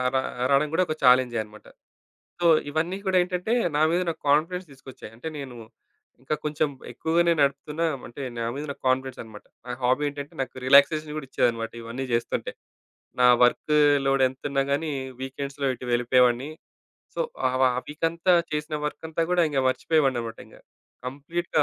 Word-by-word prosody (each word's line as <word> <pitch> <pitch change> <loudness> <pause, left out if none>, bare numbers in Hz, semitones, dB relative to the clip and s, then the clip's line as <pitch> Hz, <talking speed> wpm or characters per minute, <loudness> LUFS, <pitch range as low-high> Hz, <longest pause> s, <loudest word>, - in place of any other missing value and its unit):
ర - - +5 0.3
రావడం 140 +2 +3
కూడా 185 - +3
ఒక 155 - -1
చాలెంజే 125 -1 +5
అన్నమాట. 105 0 -16 0.7
సో, 175 - +3 0.2
ఇవన్నీ 160 +5 -1
కూడా 190 -1 +3
ఏంటంటే, 180 +4 -2 0.2
నా 150 - +2
మీద 175 +2 +2
నాకు 165 - -5
కాన్ఫిడెన్స్ 170 +5 +1
తీసుకొచ్చాయి. 130 -4 -12
అంటే 120 +7 -8
నేను 135 -3 -7 0.7
ఇంకా 135 +4 -2
కొంచెం 150 0 0 0.2
ఎక్కువగానే 170 +1 +2
నడుపుతున్నా 140 +4 0 0.2
అంటే, 120 +4 -9 0.2
నా - - -1
మీద 145 - -4
నాకు - - -11
కాన్ఫిడెన్సన్నమాట. 130 -5 -3 0.2
నా 125 - -5
హాబీ 130 +4 +2
ఏంటంటే, 145 0 -8
నాకు 135 - -5
రిలాక్సేషన్ 150 +3 +5
కూడా 145 -3 -6
ఇచ్చేదన్నమాట. 115 -3 0
ఇవన్నీ 120 +4 -5
చేస్తుంటే. 115 0 -1 0.7
నా 125 - +7 0.2
వర్కు 125 +5 +3 0.3
లోడెంతన్నా 135 +1 +1
గానీ 150 +2 -1 0.3
వీకెండ్స్‌లో 140 +1 -4
ఇటు 125 - -9
వెళ్ళిపోయేవాడిని. 125 +2 +3 0.6
సో, - - -3 0.3
ఆ - - -1
వా 130 - +6
ఆ - - -1
వీకంతా 165 +4 +1 0.2
చేసిన 150 0 -3
వర్కంతా 160 +2 -3
కూడా 180 -1 +4 0.3
మర్చిపోయేవాడినన్నమాట 130 -5 0
ఇంక. - - -17 0.5
కంప్లీట్‌గా 150 +5 -1
140 Hz, 145 wpm, -25 LUFS, 130-160 Hz, 0.7 s, నా